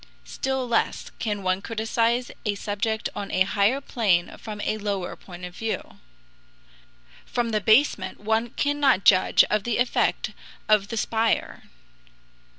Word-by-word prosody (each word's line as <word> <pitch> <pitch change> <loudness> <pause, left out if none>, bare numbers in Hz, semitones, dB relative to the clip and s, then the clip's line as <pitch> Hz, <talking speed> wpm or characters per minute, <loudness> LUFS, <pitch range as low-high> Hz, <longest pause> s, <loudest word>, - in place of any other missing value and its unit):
Still 265 -1 -2
less 235 -1 0
can 205 -3 -2
one 185 +1 0
criticise 230 +2 0
a 210 -2 0
subject 215 +2 -2
on 200 -1 -5
a 185 - -1
higher 205 +6 +2
plane 205 -10 0
from 215 -2 -7
a 215 - -1
lower 200 -3 -3
point 180 -1 -10
of 180 0 -10
view. 225 +2 -4 1.3
From 240 -2 -1
the 215 -1 0
basement 225 +8 +3
one 220 +3 0
cannot 285 -6 +2
judge 185 -2 +6
of 210 -1 +1
the 235 0 -1
effect 245 0 +1 0.4
of 210 -2 +4
the 230 - -5
spire. 225 0 0
220 Hz, 140 wpm, -25 LUFS, 200-235 Hz, 1.3 s, judge